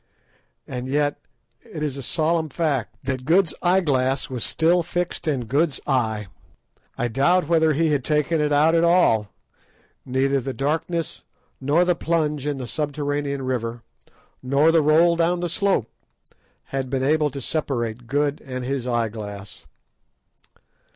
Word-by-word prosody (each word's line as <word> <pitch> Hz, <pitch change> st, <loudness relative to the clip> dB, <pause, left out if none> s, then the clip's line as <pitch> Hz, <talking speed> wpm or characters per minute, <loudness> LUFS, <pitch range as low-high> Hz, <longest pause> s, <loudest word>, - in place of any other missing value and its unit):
And 125 Hz, 0 st, -5 dB
yet 145 Hz, +2 st, 0 dB, 0.4 s
it 155 Hz, -2 st, -7 dB
is 145 Hz, -3 st, -2 dB
a 140 Hz, -, -6 dB
solemn 160 Hz, +4 st, 0 dB
fact 135 Hz, -7 st, -1 dB
that 130 Hz, -1 st, -3 dB
Good's 165 Hz, +3 st, +3 dB
eye 185 Hz, +2 st, +3 dB
glass 135 Hz, -4 st, 0 dB
was 125 Hz, -3 st, -3 dB
still 170 Hz, +2 st, +2 dB
fixed 175 Hz, 0 st, -3 dB
in 135 Hz, -6 st, 0 dB
Good's 145 Hz, +5 st, +1 dB
eye. 110 Hz, -6 st, 0 dB, 0.7 s
I 120 Hz, -, 0 dB
doubt 150 Hz, +9 st, +2 dB
whether 160 Hz, -2 st, +3 dB
he 160 Hz, +2 st, +1 dB
had 145 Hz, -, +2 dB
ever -, -, -28 dB
taken 150 Hz, +2 st, +1 dB
it 150 Hz, 0 st, 0 dB
out 150 Hz, +3 st, +4 dB
at 165 Hz, 0 st, +3 dB
all. 170 Hz, -, +3 dB, 0.7 s
Neither 135 Hz, +1 st, +1 dB
the 135 Hz, +1 st, -5 dB
darkness, 160 Hz, +3 st, -2 dB, 0.4 s
nor 150 Hz, +6 st, +2 dB
the 180 Hz, -, +3 dB
plunge 150 Hz, -4 st, -1 dB
in 145 Hz, -2 st, -1 dB
the 130 Hz, -, -5 dB
subterranean 145 Hz, +1 st, -2 dB
river, 120 Hz, -2 st, -3 dB, 0.6 s
nor 140 Hz, +5 st, +3 dB
the 165 Hz, -1 st, +4 dB
roll 160 Hz, +3 st, +4 dB
down 170 Hz, +1 st, +1 dB
the 175 Hz, -, -1 dB
slope, 190 Hz, -, +1 dB, 0.9 s
had 135 Hz, -1 st, -2 dB
been 130 Hz, 0 st, -1 dB
able 150 Hz, +2 st, +2 dB
to 140 Hz, -, -7 dB
separate 120 Hz, -5 st, -2 dB
Good 145 Hz, +2 st, 0 dB
and 130 Hz, -2 st, -5 dB
his 130 Hz, -1 st, -2 dB
eye 120 Hz, -2 st, 0 dB
glass. 105 Hz, -2 st, -9 dB
145 Hz, 155 wpm, -23 LUFS, 130-160 Hz, 0.9 s, out